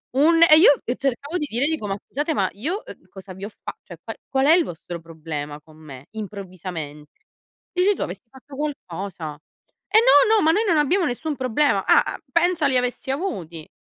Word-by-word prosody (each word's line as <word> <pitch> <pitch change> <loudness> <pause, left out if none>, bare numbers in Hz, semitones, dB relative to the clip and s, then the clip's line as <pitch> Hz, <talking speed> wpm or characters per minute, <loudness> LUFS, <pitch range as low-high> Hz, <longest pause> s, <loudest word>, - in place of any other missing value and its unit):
un 330 +4 +4
e 310 -2 +8
io 315 -3 +7
e 245 - -2
cercavo 280 +5 -2
di 300 - -2
dire 240 +5 0
dico: 310 -9 -2
"Ma 195 - -2
scusate, 295 +9 -3
ma 195 -9 +1
io, 325 - -4
ehm, - - -13
cosa 190 -1 -11
vi 190 +2 -8
ho 210 - -6
fa - - -9
cioè - - -11
qua - - -6 0.2
qual 265 0 +1
è 315 - +7
il 350 0 +5
vostro 170 +1 -7
problema 155 -3 -7
con 155 0 -19
me, 140 -4 -12
improvvisamente?" 180 -8 -8 0.5
Dici 370 +3 +2
tu: - - -7
"Avessi 185 +3 -5
fatto 270 +2 -14
qualcosa." 190 - -5 0.5
"Eh, 440 - +5
no, 470 -1 +6
no, 430 - +3
ma 315 - +4
noi 420 +6 +2
non 340 -4 +3
abbiamo 345 +6 +2
nessun 300 +3 -3
problema". 265 +3 +1
Ah, - - +5
uhm, - - -11
pensa 340 -2 +2
li 260 -2 +2
avessi 250 +1 -2
avuti. 180 - -4
255 Hz, 205 wpm, -23 LUFS, -, 0.5 s, e